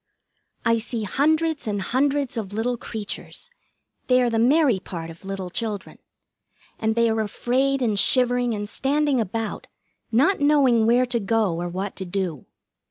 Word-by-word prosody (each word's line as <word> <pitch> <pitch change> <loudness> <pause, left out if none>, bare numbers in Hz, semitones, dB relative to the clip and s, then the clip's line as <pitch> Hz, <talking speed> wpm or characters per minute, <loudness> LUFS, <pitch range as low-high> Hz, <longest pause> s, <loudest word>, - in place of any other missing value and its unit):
I 230 0 +3
see 225 0 -3
hundreds 310 - +1
and 205 -1 -1
hundreds 275 +5 0
of 205 -4 -4
little 235 +3 0
creatures 225 - -6 0.6
(they 255 0 +4
are 240 - +1
the 225 - +1
Mary 260 -2 +4
part 165 -3 -7
of 165 - -15
little 190 -2 -5
children), 215 -1 -4 0.8
and 220 0 0
they 235 0 +3
are 220 -1 +1
afraid 260 +5 0
and 215 -4 +1
shivering 245 -1 +3
and 205 0 -4
standing 275 +2 +1
about, 220 +1 -4 0.4
not 280 - +3
knowing 275 -6 +4
where 245 +2 +4
to 240 -1 -1
go 210 -3 +1
or 175 - -3
what 190 +3 -4
to 190 - -4
do. 175 -5 -3
230 Hz, 160 wpm, -23 LUFS, 205-260 Hz, 0.8 s, they